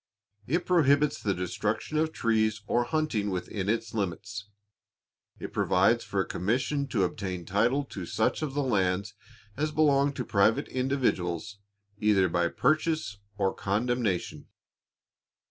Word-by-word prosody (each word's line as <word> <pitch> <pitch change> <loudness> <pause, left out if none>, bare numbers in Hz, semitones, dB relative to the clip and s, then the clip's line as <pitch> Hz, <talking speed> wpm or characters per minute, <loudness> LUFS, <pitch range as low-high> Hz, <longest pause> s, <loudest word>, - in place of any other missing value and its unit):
It 170 +6 0
prohibits 150 -4 +3
the 100 -2 0
destruction 105 - -2
of 160 0 +1
trees, 110 -5 +1
or 120 +3 +1
hunting 130 -8 0
within 95 +1 -3
its 115 0 -1
limits. 100 +1 -4 0.9
It - - -7
provides - - +3
for - - -3
a - - -2
commission 130 +9 -1
to 105 -8 +1
obtain 90 -1 -3
title 115 - +2
to 95 -10 -7
such 110 +6 0
of 145 -3 -3
the 145 - +1
lands 100 -4 0 0.4
as 150 +2 -1
belong 145 -2 +3
to 125 -3 -4
private 105 +2 +2
individuals, 105 - -1 0.4
either 105 -3 +3
by 85 0 +1
purchase 155 - 0 0.2
or 95 -1 +1
condemnation. 105 -2 -1
110 Hz, 130 wpm, -28 LUFS, 100-140 Hz, 0.9 s, prohibits